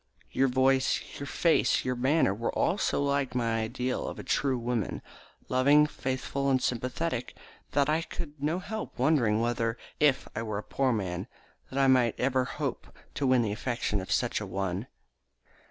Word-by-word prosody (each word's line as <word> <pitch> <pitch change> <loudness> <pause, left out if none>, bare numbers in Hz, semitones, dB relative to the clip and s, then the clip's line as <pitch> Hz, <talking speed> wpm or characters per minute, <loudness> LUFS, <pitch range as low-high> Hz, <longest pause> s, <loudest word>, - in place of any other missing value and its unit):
Your 135 - +3
voice, 130 +1 +3 0.2
your 140 - -5
face, 165 +3 +2
your 125 0 0
manner, 130 -3 +2
were 115 +4 -2
all 180 +6 +1
so 140 - +1
like 140 -2 0
my 115 -2 +1
ideal 125 +3 -2
of - - -5
a - - -7
true 135 -3 +1
woman, 120 -3 -2 0.4
loving, 140 +4 +5
faithful, 135 0 -2
and 130 -1 +3
sympathetic, 125 +2 -2 0.4
that 140 -1 +3
I 155 +2 +2
could 150 -3 -7
not 165 +5 -1
help 220 +3 -5
wondering 125 -6 +3
whether, 115 -1 0 0.2
if 145 -3 +3
I 110 - -2
were 110 -2 -3
a 105 - -4
poor 135 -2 0
man, 95 -3 -2 0.4
I 135 +1 +2
might 125 -3 +3
ever 130 0 +2
hope - - -4 0.3
to 140 - -1
win 130 -2 +4
the 105 - -1
affection 110 -2 -2
of 95 - -8
such - - +1
a - - -5
one." 95 +3 -3
130 Hz, 170 wpm, -29 LUFS, 115-140 Hz, 0.4 s, loving